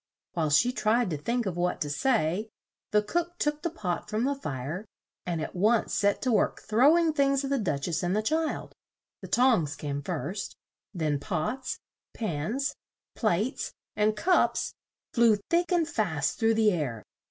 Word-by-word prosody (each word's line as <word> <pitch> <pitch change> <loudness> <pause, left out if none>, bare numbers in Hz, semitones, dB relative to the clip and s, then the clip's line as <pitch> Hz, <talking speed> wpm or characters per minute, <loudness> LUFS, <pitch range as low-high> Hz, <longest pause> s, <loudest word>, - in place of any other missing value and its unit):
While 160 -3 0
she 195 +12 +4
tried 220 -2 +1
to 155 - -1
think 235 +9 -1
of 185 -3 -2
what 180 0 0
to 145 - -1
say, 210 - +1 0.4
the 210 0 +3
cook 345 +9 -2
took 295 -1 -1
the 340 - -1
pot 205 - -3
from 215 +2 0
the 280 +2 +2
fire, 155 - -4 0.4
and 170 -2 -1
at 155 - -4
once 215 +5 +2
set 205 0 +1
to 255 - +2
work 220 - +2
throw 265 +10 +5
ing 330 -2 +2
things 275 -1 +2
at 275 - -3
the 275 - +2
Duch 150 -9 -1
ess 170 - -1
and 180 +2 0
the 215 - +1
child 315 +6 -1 0.5
the - - -7
tongs 225 - +3
came 145 -1 -4
first, 180 +5 -4 0.4
then 155 -6 -1
pots, 180 - -2 0.4
pans, 215 - -2 0.4
plates 215 - 0 0.2
and 210 0 +2
cups 360 - +2 0.4
flew 230 -3 +5 0.2
thick 345 +2 +2
and 340 -3 +3
fast 180 - -1
through 225 -1 +3
the 220 -1 +4
air. 130 - -2
215 Hz, 175 wpm, -28 LUFS, 170-265 Hz, 0.5 s, throw